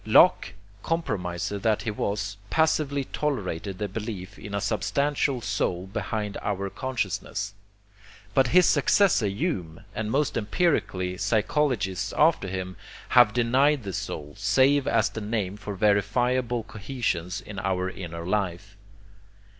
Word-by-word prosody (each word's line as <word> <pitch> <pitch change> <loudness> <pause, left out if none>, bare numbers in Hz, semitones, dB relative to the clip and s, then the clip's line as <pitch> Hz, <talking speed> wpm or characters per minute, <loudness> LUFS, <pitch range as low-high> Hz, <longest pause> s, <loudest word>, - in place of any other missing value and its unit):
Locke, - - +5 0.3
compromiser 100 - -2
that 110 +1 +1
he 115 - -1
was, 100 -1 -2
passively 155 -3 +2
tolerated 100 - -3
the 105 - -2
belief 100 -1 -6
in 100 0 -6
a - - +1
substantial 135 +5 0
soul 95 -3 -1
behind 105 +1 -3
our 100 -1 -2
consciousness. 105 -5 -3 0.8
But 135 +1 +4
his 180 +6 +6
successor 155 - +4
Hume, 95 - -3
and 110 -1 -3
most 140 +4 +1
empirical 105 - 0
psychologists 110 - 0
after 155 -9 +4
him, 95 0 -4 0.3
have 100 - +7
denied 130 +4 +3
the 95 -2 -5
soul, 75 -3 -5
save 130 +6 +3
as 115 -2 +3
the 110 - -5
name 105 -3 -2
for 105 -1 -6
verifiable 115 +5 +1
cohesions 100 -5 -3
in 105 -2 -8
our 95 -1 0
inner 85 -3 -6
life. 95 0 -2
105 Hz, 125 wpm, -26 LUFS, 95-130 Hz, 0.8 s, have